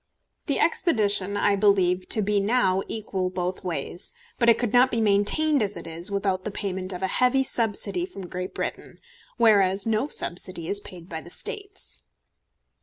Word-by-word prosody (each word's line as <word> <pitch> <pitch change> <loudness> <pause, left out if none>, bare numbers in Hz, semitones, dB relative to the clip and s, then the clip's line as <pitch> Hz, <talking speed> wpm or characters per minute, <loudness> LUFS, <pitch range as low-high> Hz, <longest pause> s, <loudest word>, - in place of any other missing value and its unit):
The - - +1
expedition 205 - +1
I 205 0 +3
believe 190 -3 +2
to 215 - +5
be 205 +1 +1
now 200 -3 +2
equal 195 -4 -3
both 180 0 -4
ways; 175 0 -2 0.3
but 235 -1 +4
it 230 - +6
could 240 -2 -2
not 250 +1 +6
be 230 - -1
maintained 225 +8 +3
as 205 -1 -2
it - - -9
is 165 +3 -3
without 195 -2 -1
the 215 - -3
payment 190 -2 -1
of 180 0 -6
a - - +2
heavy 250 +6 +3
subsidy 245 - 0
from 270 - -9
Great 180 +1 -6
Britain, - - -5 0.4
whereas 200 -4 +4
no 225 +4 0
subsidy 175 - -2
is 200 - 0
paid 175 -4 -12
by 160 -3 -6
the 175 - -13
States. 400 - -5
200 Hz, 175 wpm, -25 LUFS, 185-230 Hz, 0.4 s, it